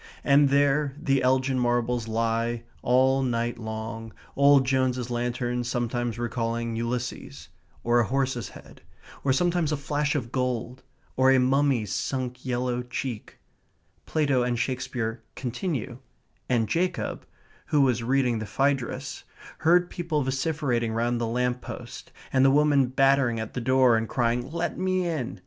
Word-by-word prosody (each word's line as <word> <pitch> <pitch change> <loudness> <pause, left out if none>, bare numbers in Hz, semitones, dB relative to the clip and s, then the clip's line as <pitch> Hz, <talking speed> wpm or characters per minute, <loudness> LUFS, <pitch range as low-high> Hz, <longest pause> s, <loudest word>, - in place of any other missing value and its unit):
And 140 0 +5
there 140 0 +2
the 135 -2 +1
Elgin 130 +1 +2
Marbles 120 -1 0
lie, 115 +1 -1 0.2
all 130 +2 +3
night 120 -2 -1
long, 110 0 -6 0.2
old 140 -1 +5
Jones's 130 -2 0
lantern 120 0 -1
sometimes 120 -1 -2
recalling 115 -1 -2
Ulysses, 120 +2 -4 0.3
or 120 +1 +3
a 120 - +3
horse's 135 -2 -1
head; - - -14 0.4
or 140 - +2
sometimes 170 +2 +1
a 150 - 0
flash 145 +1 -1
of 120 -5 -3
gold, 125 -1 -2 0.3
or 130 0 +4
a 135 - +5
mummy's 130 -5 +2
sunk 125 -2 -3
yellow 125 -1 -1
cheek. 125 -2 -6 0.7
Plato 145 -5 +1
and 120 -1 0
Shakespeare 125 -3 -3
continue; 125 - -4 0.5
and 115 -4 +2
Jacob, 180 - -2 0.4
who 150 - +3
was 125 -4 +2
reading 125 -1 +1
the 110 - -5
Phaedrus, 130 +2 -1 0.4
heard 175 +2 +3
people 165 -4 -1
vociferating 130 -4 -1
round 120 +1 0
the 115 - 0
lamp 125 +1 -1
post, - - -9 0.2
and 130 0 +4
the 135 - +6
woman 145 -1 +4
battering 135 -2 +2
at 110 0 -5
the 125 - -3
door 130 -1 +4
and 110 0 -3
crying, 120 +1 0
"Let 170 +1 -3
me 185 -1 0
in!" 125 - -3
125 Hz, 145 wpm, -26 LUFS, 120-135 Hz, 0.7 s, the